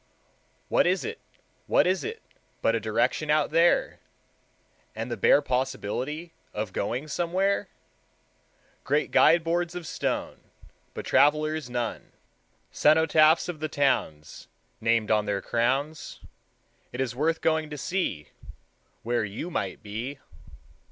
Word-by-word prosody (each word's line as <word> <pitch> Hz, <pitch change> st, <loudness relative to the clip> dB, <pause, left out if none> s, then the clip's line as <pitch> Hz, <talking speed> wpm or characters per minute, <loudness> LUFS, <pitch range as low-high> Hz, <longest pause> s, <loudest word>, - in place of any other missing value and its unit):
What -, -, +3 dB
is -, -, +1 dB
it, 450 Hz, +1 st, -5 dB, 0.5 s
what -, -, +4 dB
is 185 Hz, +1 st, +1 dB
it 450 Hz, +1 st, -6 dB, 0.4 s
But 115 Hz, -, +3 dB
a 115 Hz, -, +1 dB
direction 115 Hz, +7 st, 0 dB
out 150 Hz, -1 st, +2 dB
there, 170 Hz, +2 st, +3 dB, 1.0 s
And 115 Hz, +2 st, -5 dB
the -, -, -1 dB
bare 145 Hz, -, +4 dB
possibility 130 Hz, +5 st, -3 dB, 0.2 s
Of 105 Hz, -2 st, -3 dB
going 125 Hz, +9 st, -2 dB
somewhere? 180 Hz, +6 st, 0 dB, 1.2 s
Great 145 Hz, +2 st, 0 dB
guide 165 Hz, +2 st, +5 dB
boards 170 Hz, +1 st, -1 dB
of 175 Hz, -2 st, -6 dB
stone, -, -, -3 dB, 0.6 s
But -, -, -6 dB
travelers 155 Hz, -1 st, +2 dB
none; 120 Hz, -1 st, -4 dB, 0.6 s
Cenotaphs 155 Hz, +1 st, +4 dB
of 175 Hz, -4 st, -5 dB
the 155 Hz, 0 st, -3 dB
towns 80 Hz, -, -1 dB, 0.3 s
Named 115 Hz, -1 st, +1 dB
on 105 Hz, -1 st, +3 dB
their 100 Hz, -1 st, 0 dB
crowns. 135 Hz, +9 st, -1 dB, 0.7 s
It 125 Hz, -, -7 dB
is 125 Hz, -3 st, -1 dB
worth 160 Hz, +4 st, 0 dB
going 160 Hz, -1 st, 0 dB
to 150 Hz, -, -6 dB
see 155 Hz, -, -2 dB, 0.7 s
Where 120 Hz, 0 st, 0 dB
you 105 Hz, -, -5 dB
might 95 Hz, -, -3 dB
be. 115 Hz, +7 st, -5 dB
145 Hz, 125 wpm, -26 LUFS, 115-160 Hz, 1.2 s, guide